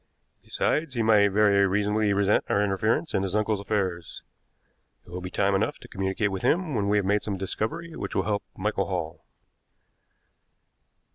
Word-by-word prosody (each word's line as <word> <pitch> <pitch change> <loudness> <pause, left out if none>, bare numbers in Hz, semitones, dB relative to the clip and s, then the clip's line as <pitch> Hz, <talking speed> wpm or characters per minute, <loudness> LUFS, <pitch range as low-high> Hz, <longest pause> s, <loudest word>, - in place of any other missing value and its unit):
Besides, 150 -4 -1
he 115 - +1
might 105 -2 +5
very 100 -1 +3
reasonably 105 +2 +1
resent 100 +1 +2
our 100 - +2
interference 110 - 0
in - - +1
his 95 0 -2
uncle's 105 -1 +1
affairs. 95 -4 -3 0.8
It - - -16
will 90 +1 -5
be 90 - -5
time 100 +1 +1
enough 110 +9 0
to 125 - -14
communicate 95 0 -1
with 95 -1 -4
him 170 -2 +1
when 100 -4 0
we 105 - +3
have 100 - 0
made 105 +2 +2
some 100 -2 -4
discovery 160 - -4
which - - -5
will - - +2
help 105 -1 -1 0.2
Michael 100 0 -1
Hall." 85 -4 -4
100 Hz, 170 wpm, -26 LUFS, 95-110 Hz, 0.8 s, might